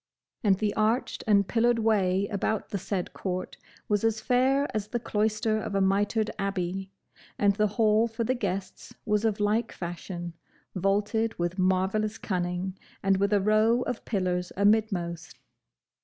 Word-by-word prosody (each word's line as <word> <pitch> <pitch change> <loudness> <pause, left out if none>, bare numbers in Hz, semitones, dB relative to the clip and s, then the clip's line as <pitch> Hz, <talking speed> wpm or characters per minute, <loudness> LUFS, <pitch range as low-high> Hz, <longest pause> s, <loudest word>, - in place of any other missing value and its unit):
And 195 -3 +4
the 210 0 0
arched 220 +4 0
and 200 -2 +4
pillared 240 0 +2
way 200 -3 +2
about 210 0 -1
the 200 - -3
said 185 -1 -3
court 185 -1 -4 0.3
was 205 0 +1
as 225 -1 +1
fair 260 +5 +2
as 210 -1 -1
the 240 +3 -2
cloister 215 0 0
of 215 -2 -4
a - - +3
mitred 205 +3 +1
abbey; 195 -1 -2 0.5
and 200 -1 +3
the 210 0 +2
hall 220 0 +4
for 230 +1 -3
the 255 - +1
guests 195 -5 -4
was 210 0 +1
of 215 -2 +1
like 210 +3 +1
fashion, 175 0 -6 0.4
vaulted 205 +4 0
with 175 +2 -2
marvellous 190 +4 +1
cunning, 180 0 -3 0.2
and 195 -1 +3
with 200 +1 +1
a 205 -1 +3
row 215 +4 +3
of 245 - -4
pillars 180 -4 -1
amidmost. 200 -5 +1
205 Hz, 155 wpm, -27 LUFS, 190-220 Hz, 0.5 s, And